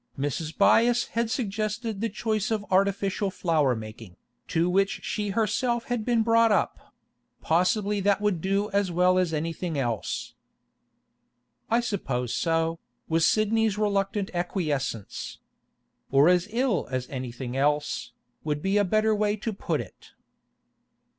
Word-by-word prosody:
Mrs. 145 +3 -3
Byass 240 +1 +4
had 230 0 -1
suggested 215 -2 -2
the 230 - 0
choice 215 -3 -1
of 215 -2 -1
artificial 195 +1 +1
flower 155 -8 +1
making, 110 -3 -9 0.3
to 165 +1 +1
which 195 +2 +1
she 210 -1 -2
herself 230 +3 0
had 235 -3 -1
been 235 -1 +2
brought 230 0 +4
up; - - -1 0.4
possibly 200 +5 +1
that 200 0 +2
would 205 -5 0
do 200 +3 0
as 200 -2 +1
well 180 +1 +3
as 180 -3 +1
anything 165 +1 -3
else. 120 -5 -2 1.4
'I 230 +2 +3
suppose 135 - -2
so,' 165 0 0 0.3
was 165 0 +3
Sidney's 215 -1 +2
reluctant 200 -1 0
acquiescence. 155 - -3 0.7
'Or 140 +4 +5
as 180 +1 +3
ill 235 -4 0
as 130 -1 -3
anything 125 -1 -5
else, 145 +2 0 0.3
would 150 -1 -2
be 195 +2 +2
a 205 - +4
better 215 +3 +2
way 210 0 +1
to 215 +1 -4
put 200 - -2
it. - - -14
195 Hz, 135 wpm, -26 LUFS, 160-215 Hz, 1.4 s, Or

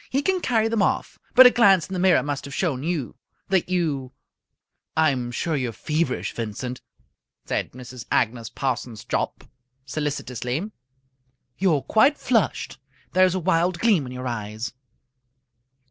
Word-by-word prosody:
He 275 +2 0
can 375 +1 +1
carry 225 -6 +2
them 225 -2 0
off. - - 0 0.2
But 260 0 +10
a 250 - +9
glance 195 -8 +5
in 190 - -7
the 185 - -2
mirror 185 0 +4
must 145 -2 -3
have 140 -1 -7
shown 150 -9 0
you 155 -5 -2 0.4
that 190 -2 +1
you 150 -8 -1 0.4
" - - -29
"I'm 125 -4 -1
sure 155 +6 -2
you're 130 -4 -1
feverish, 150 +2 -1
Vincent," 120 +3 -5 0.6
said - - -2
Mrs. 125 -1 -9
Agnes 115 -1 +1
Parsons 125 -5 -3
Jopp, - - -2 0.4
solicitously. 145 - -3 0.9
"You 185 -4 +3
are 140 - -2
quite 270 +7 +4
flushed. 225 - 0 0.3
There 185 +1 +6
is 185 0 +1
a - - 0
wild 175 0 +1
gleam 190 - +2
in - - -8
your 125 0 -6
eyes." 110 0 -4
150 Hz, 155 wpm, -24 LUFS, 125-190 Hz, 0.9 s, But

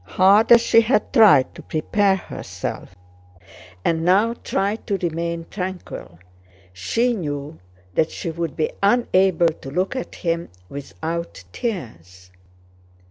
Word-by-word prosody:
Hard 200 - +4
as 235 -1 +9
she 230 - +5
had 225 0 0
tried 205 - +6
to - - -11
prepare 195 +5 +1
herself, 175 - -7 0.9
and 165 -1 +1
now 200 +6 +3
tried 205 -1 -2
to 200 -3 0
remain 170 -1 -3
tranquil, 180 - -6 0.6
she 230 - 0
knew 145 - -5 0.3
that 160 - +2
she 165 - -5
would 165 -3 -4
be 155 - -1
unable 190 -5 +3
to 155 -4 -9
look 185 - -1
at 255 - -5
him 170 0 -2 0.2
without 160 - -6
tears. 90 - -6
175 Hz, 125 wpm, -22 LUFS, 155-205 Hz, 0.9 s, as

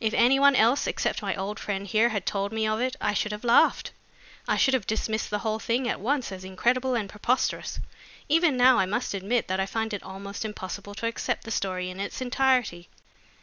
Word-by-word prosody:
If 220 0 +1
any 255 +3 +5
one 280 0 +6
else 240 +4 +3
except - - -1
my - - -2
old 200 +2 -4
friend 200 -1 -3
here 220 +4 +3
had 205 -5 -3
told 200 0 -1
me 220 0 -1
of 215 +1 0
it, 255 +1 -1
I 210 - 0
should 210 +1 -1
have 210 +2 -6
laughed. 235 0 +3 0.6
I - - +1
should 265 - +3
have 250 -7 0
dismissed 220 0 -1
the 210 - -1
whole 220 0 0
thing 240 +3 -1
at - - -1
once 255 +2 -1
as 185 -1 -7
incredible 245 +7 0
and 215 -4 -1
preposterous. 220 +6 -1 0.5
Even 315 -2 +3
now, 250 -1 +6
I 190 - +2
must 215 +5 -2
admit 200 +5 -1
that 185 +1 -1
I 190 - 0
find 220 +1 -2
it 205 - -3
almost 200 +2 -7
impossible 205 -1 -6
to 230 - -4
accept 230 - -2
the 225 - -8
story 185 -3 -2
in 185 - -10
its 200 - -4
entirety." 250 -8 +1
220 Hz, 220 wpm, -26 LUFS, 200-245 Hz, 0.6 s, one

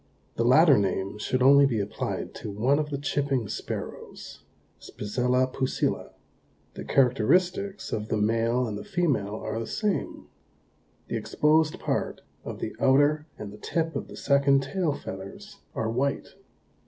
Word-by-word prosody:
The 115 - 0
latter 140 +2 +6
name 95 +1 -2
should 125 +4 0
only 140 +1 +7
be 115 -5 -1
applied 100 +1 -4
to - - -7
one 120 +8 +1
of 150 -1 -2
the 145 - -2
Chipping 135 -4 -1
Sparrows - - -7 0.4
(Spizella 125 +4 0
pusilla). 130 -1 -1 0.6
The - - -7
characteristics 180 - +1
of 105 0 -2
the 110 - -1
male 115 +3 +1
and 105 -3 -4
the - - -7
female 150 - 0
are 110 0 -4
the 115 - -4
same. 210 -2 -2 0.8
The - - -2
exposed 155 +1 +2
part - - -2 0.2
of - - -6
the - - -5
outer 145 +3 +3
and 100 -1 -7
the 105 - -12
tip 165 +5 -2
of - - -3
the - - -11
second 140 -1 +3
tail 170 +3 -1
feathers 200 - -9 0.2
are 110 0 -1
white. 135 +4 -1
135 Hz, 150 wpm, -27 LUFS, 110-150 Hz, 0.8 s, only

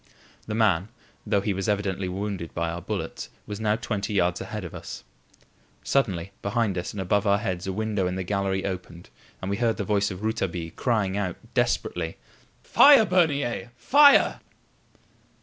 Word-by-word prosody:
The 110 - -3
man, 100 -5 +2 0.4
though 100 - +2
he 100 0 -1
was 95 +2 -2
evidently 95 -2 -1
wounded 95 -2 -4
by 85 0 -1
our 85 +1 -5
bullets, - - -5 0.2
was 105 0 -6
now 105 -1 +1
twenty 105 -2 -3
yards 90 -1 +1
ahead 105 -3 -5
of 85 - -8
us. - - -8 0.8
Suddenly, 95 -9 0
behind 105 -1 0
us, 90 0 -3
and 105 - -7
above 100 +3 +1
our 100 0 +4
heads, 90 -2 -3
a - - -1
window 105 -1 -1
in 90 - -2
the 95 - -3
gallery 95 0 -1
opened 90 -2 -6 0.3
and 95 - -2
we 100 - -1
heard 115 -2 +1
the - - -2
voice 100 -1 +1
of 95 +1 -7
Rouletabille 95 -7 -2
crying 105 -6 0
out 95 -4 -2 0.2
desperately: 80 -2 -1 0.5
"Fire, 280 -6 +7
Bernier! 145 - +1
Fire!" 285 - +6
100 Hz, 165 wpm, -25 LUFS, 90-110 Hz, 0.8 s, Fire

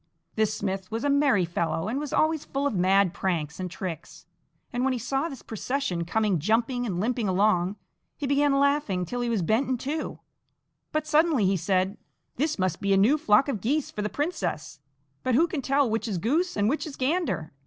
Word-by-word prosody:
This 215 -1 +1
smith 190 -3 -3
was 225 +1 -3
a 285 - +2
merry 280 -10 +3
fellow, 170 +1 -2
and 245 +6 -1
was 295 -1 -5
always 315 -1 +2
full 275 +1 -3
of 285 - +1
mad 190 0 +3
pranks 165 -6 -2
and 185 -1 -3
tricks, 170 -2 -7 0.5
and 245 +1 0
when 265 0 +2
he - - -1
saw 270 +7 -1
this 270 -5 -9
procession 220 -6 -2
coming 205 -1 +1
jumping 235 - +1
and 180 -4 -2
limping 235 +1 0
along, 190 -1 +2 0.4
he 290 - -3
began 280 0 +3
laughing 280 -11 +1
till 245 +6 -4
he 240 - -1
was 220 -6 0
bent 225 +10 +1
in 260 - +1
two, 295 +6 -4 0.7
but 310 -1 -1
suddenly 305 - +3
he 190 +1 +3
said: 190 +2 0 0.4
"This 305 +4 0
must 185 -3 -1
be 200 0 +2
a - - +4
new 220 +10 +5
flock 240 -3 +3
of 225 -9 -2
geese 280 +7 0
for 210 - -4
the 210 - -1
princess: 200 - -3 0.4
but 255 - +1
who 320 +7 +5
can 330 -5 -3
tell 275 +1 +2
which 225 +1 -1
is 200 -5 -2
goose 300 - 0
and 205 0 +2
which 305 +7 -1
is 285 - -7
gander? 275 - -1
225 Hz, 205 wpm, -26 LUFS, 190-280 Hz, 0.7 s, new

